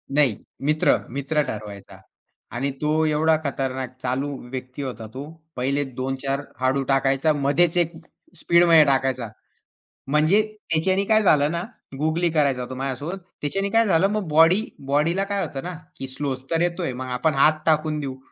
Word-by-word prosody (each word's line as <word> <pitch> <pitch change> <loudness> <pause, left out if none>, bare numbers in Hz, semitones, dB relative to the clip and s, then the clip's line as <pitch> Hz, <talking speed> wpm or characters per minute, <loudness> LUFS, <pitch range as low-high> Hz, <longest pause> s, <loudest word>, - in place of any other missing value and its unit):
नाही, 135 -8 +3 0.3
मित्र, 155 +1 +3
मित्र 140 +4 -1
ठरवायचा 100 -2 -8 0.6
आणि 135 +3 -1
तो 155 +1 +2
एवढा 155 +1 +3
खतरनाक, 130 -2 -3
चालू 130 +3 -1 0.2
व्यक्ती 130 +1 -6
होता 125 -5 -6
तो. 135 +2 -6 0.3
पहिले 140 +3 0 0.2
2-4 135 +1 -2 0.2
हळू 135 +1 +1
टाकायचा 135 +3 +2
मध्येच 150 +5 +2
एक 170 -1 +2 0.4
स्पीडमध्ये 170 -1 +5
टाकायचा. 130 -3 +1 0.8
म्हणजे 155 +8 +4 0.3
त्याच्याने 185 +5 +2
काय 215 +1 +3
झालं 150 -6 +4
ना, 170 - -2 0.4
गुगली 160 +3 +1
करायचा 140 -5 +1
तो 130 - -4
माझ्यासोबत. 135 +7 -4 0.2
त्याच्याने 195 +7 -1
काय 225 +1 +4
झालं, 185 -1 +3
मग 210 -5 -2
बॉडी 165 +7 +5 0.2
बॉडीला 165 +7 +1
काय 200 0 -2
होत 135 -3 -6
ना, 180 0 -5 0.2
की 135 - -6
स्लो 135 +1 -3 0.2
तर 165 -1 +1
येतोय 175 -4 -1
मग 130 +1 -6
आपण 155 +4 +1
हात 155 +3 +4
टाकून 155 -1 +1
देऊ. 135 -2 -5
150 Hz, 155 wpm, -23 LUFS, 135-165 Hz, 0.8 s, स्पीडमध्ये